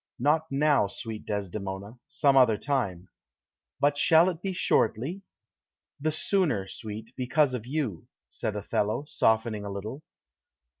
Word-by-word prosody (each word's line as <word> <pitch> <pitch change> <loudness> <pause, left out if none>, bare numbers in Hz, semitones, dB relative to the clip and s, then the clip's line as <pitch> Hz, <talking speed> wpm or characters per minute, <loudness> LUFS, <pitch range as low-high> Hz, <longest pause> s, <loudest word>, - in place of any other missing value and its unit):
"Not 150 +5 +2
now, 145 -5 +3
sweet 110 +2 -7
Desdemona; 100 +2 -4
some 145 -2 +2
other 125 -5 +6
time." 100 -12 -2 0.7
"But 145 0 +2
shall 165 +3 +6
it 175 -2 -5
be 195 - -2
shortly?" 165 - +1 0.8
"The 155 +2 0
sooner, 155 - +1
sweet, 110 +2 -7
because 130 +2 +2
of 120 -2 -4
you," 130 - -3 0.2
said 105 - -4
Othello, 105 +5 -1
softening 110 -5 +1
a 100 - -5
little. 105 +8 -6
125 Hz, 130 wpm, -28 LUFS, 105-150 Hz, 0.8 s, other